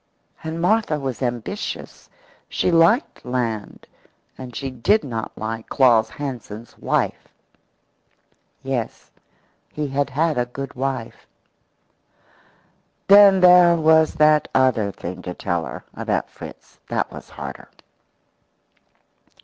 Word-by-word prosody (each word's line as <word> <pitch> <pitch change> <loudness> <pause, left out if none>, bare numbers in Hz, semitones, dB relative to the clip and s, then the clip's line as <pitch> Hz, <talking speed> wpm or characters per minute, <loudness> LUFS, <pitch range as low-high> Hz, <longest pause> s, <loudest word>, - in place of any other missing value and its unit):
And 160 +1 -4
Martha 180 -3 +1
was 135 -3 -4
ambitious; 120 - -5 0.4
she - - 0
liked 170 - +3
land, 120 -4 -3 0.5
and 125 -2 -10
she 135 -1 -4
did 200 - +2
not 115 -4 -5
like 110 +1 -5
Claus 115 -5 +4
Hansen's 120 -5 -7
wife. - - -1 1.4
Yes, 130 -4 -4 0.6
he 150 -1 -3
had 140 +1 -1
had 155 +1 0
a 120 - 0
good 135 +2 -7
wife. 130 -3 -4 1.8
Then 200 -1 +8
there 180 -1 +7
was 160 -1 +4
that 150 0 +4
other 125 -6 +2
thing 90 0 -7
to 90 -1 -6
tell 85 -1 -2
her - - -8
about - - -2
Fritz. - - -12
That - - -1
was - - -11
harder. - - -9
135 Hz, 110 wpm, -22 LUFS, 115-160 Hz, 1.8 s, Then